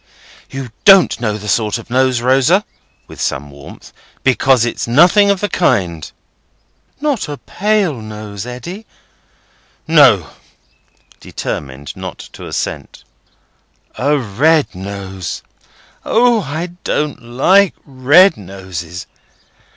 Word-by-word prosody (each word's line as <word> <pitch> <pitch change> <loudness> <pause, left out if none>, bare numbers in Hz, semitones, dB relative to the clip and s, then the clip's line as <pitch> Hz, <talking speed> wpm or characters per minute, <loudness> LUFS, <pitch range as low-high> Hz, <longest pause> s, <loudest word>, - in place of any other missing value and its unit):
"You 135 -3 -7
don't 195 -3 +6
know 105 -3 -1
the 105 0 -9
sort 105 0 0
of 115 0 -12
nose, 130 -1 +2
Rosa," 135 - +3 0.4
with - - -11
some 70 +1 -3
warmth; 70 0 -13 0.3
"because 130 -2 +3
it's 120 - -3
nothing 175 - +5
of 200 -2 +1
the 205 - 0
kind." 90 - 0 0.9
"Not 285 - -1
a 145 - -5
pale 195 - -1
nose, 105 0 -8
Eddy?" 175 - -8 1.0
"No." 135 - +5 0.9
Determined 70 0 -6
not - - -7 0.2
to - - -9
assent. - - -5 0.9
"A 145 +3 +1
red 140 +7 +1
nose? 95 -1 -6 0.6
O! 235 -1 +3
I 160 +3 -4
don't 150 -2 -2
like 160 +12 +3
red 145 +7 +4
noses. 90 -3 -8
130 Hz, 110 wpm, -16 LUFS, -, 1.0 s, don't